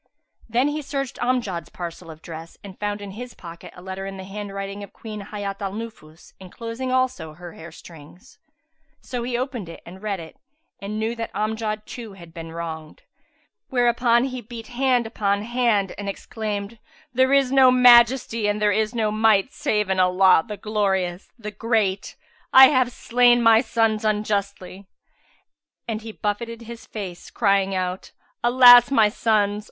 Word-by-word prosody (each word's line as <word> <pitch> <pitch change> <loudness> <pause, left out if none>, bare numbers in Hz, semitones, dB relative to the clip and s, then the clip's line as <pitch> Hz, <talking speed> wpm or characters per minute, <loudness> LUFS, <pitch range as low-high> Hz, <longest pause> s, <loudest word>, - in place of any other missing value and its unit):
Then 245 +5 +2
he 300 +1 -3
searched 275 -2 -4
Amjad's 235 -9 -1
parcel 170 -1 -8
of 160 0 -12
dress 165 0 -9
and 195 -2 -11
found 205 0 -3
in 200 -1 -7
his 240 +4 -9
pocket 170 -1 -11
a 180 - -13
letter 190 +1 -6
in 195 0 -7
the 190 - -8
handwriting 195 0 -6
of 200 - -10
Queen 210 -3 -8
Hayat 200 -1 -5
al 195 -1 -3
Nufus 205 -8 -10
enclosing 230 +7 -6
also 255 -12 -1
her 175 +1 -11
hair 165 +1 -11
strings; 165 - -15 0.6
so 245 -2 -5
he 240 0 -2
opened 245 -8 -4 0.2
and 185 +2 -12
read 205 -3 -3
it 160 -1 -11 0.4
and 205 +2 -5
knew 220 +1 -1
that 230 - -5
Amjad 215 0 -2
too 230 -4 -9
had 170 -4 -14
been 165 -1 -8
wronged; 160 -2 -7 0.7
whereupon 240 -1 +2
he 255 -2 -4
beat 230 -1 -10
hand 250 -1 +1
upon 205 -2 -1
hand 230 -4 0
and 200 -1 -4
exclaimed, 210 +1 -5 0.3
"There 260 +2 +3
is 275 -2 +3
no 265 -1 +6
Majesty 240 -2 +5
and 205 0 0
there 210 -1 +3
is 215 +3 0
no 220 -2 0
Might 215 +2 +2
save 210 -8 -1
in 190 -1 0
Allah, 185 -1 +5
the 210 -2 -6
Glorious, 195 -3 -1
the 210 -3 -7
Great! 210 -2 -1 0.4
I 265 0 +9
have 255 -3 +2
slain 240 0 +3
my 225 -1 +6
sons 225 -3 0
unjustly." 200 -3 -2 1.0
And 220 -1 -3
he 225 0 -8
buffeted 230 +3 -4
his 230 0 -10
face, 190 -5 -7
crying 195 -3 +1
out, 185 0 -4 0.3
"Alas, 245 0 +8
my 225 -6 +4
sons! 210 -1 +1
215 Hz, 165 wpm, -23 LUFS, 195-240 Hz, 1.0 s, I